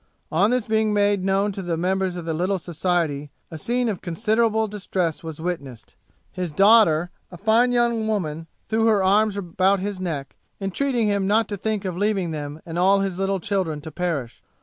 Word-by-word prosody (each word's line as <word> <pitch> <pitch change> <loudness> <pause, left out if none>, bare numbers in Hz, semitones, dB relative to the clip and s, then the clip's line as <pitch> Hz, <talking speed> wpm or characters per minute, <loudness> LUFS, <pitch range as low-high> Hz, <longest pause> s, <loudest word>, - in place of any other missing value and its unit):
On 190 +7 +3
this 250 -2 +1
being 220 -1 +1
made 205 -2 +2
known 195 +2 +1
to 195 - -5
the 175 -3 -2
members 185 +1 0
of 175 -2 -6
the 165 - -2
little 185 +5 0
society, 165 -4 -1 0.2
a 160 - -6
scene 245 +7 0
of 205 -5 -3
considerable 220 +4 +1
distress 190 -6 -2
was 160 -2 -7
witnessed; 140 -9 -6 0.4
his 180 -3 -4
daughter, 180 -2 +5 0.2
a 180 - -10
fine 225 +5 +3
young 235 -2 +1
woman, 165 -7 -2 0.2
threw 225 +1 +2
her 210 -3 +3
arms 205 +2 +3
about 190 +1 +1
his 200 0 -4
neck, 150 -7 -4 0.2
entreating 230 +4 0
him 200 -2 +1
not 220 +3 +3
to 205 - -2
think 210 0 -2
of 185 -2 -3
leaving 195 -3 0
them 150 0 -6
and 165 +1 -4
all 195 +2 +4
his 190 -2 -2
little 195 0 0
children 180 -5 -1
to 160 +1 -8
perish. 150 -8 -3
190 Hz, 190 wpm, -23 LUFS, 170-210 Hz, 0.4 s, daughter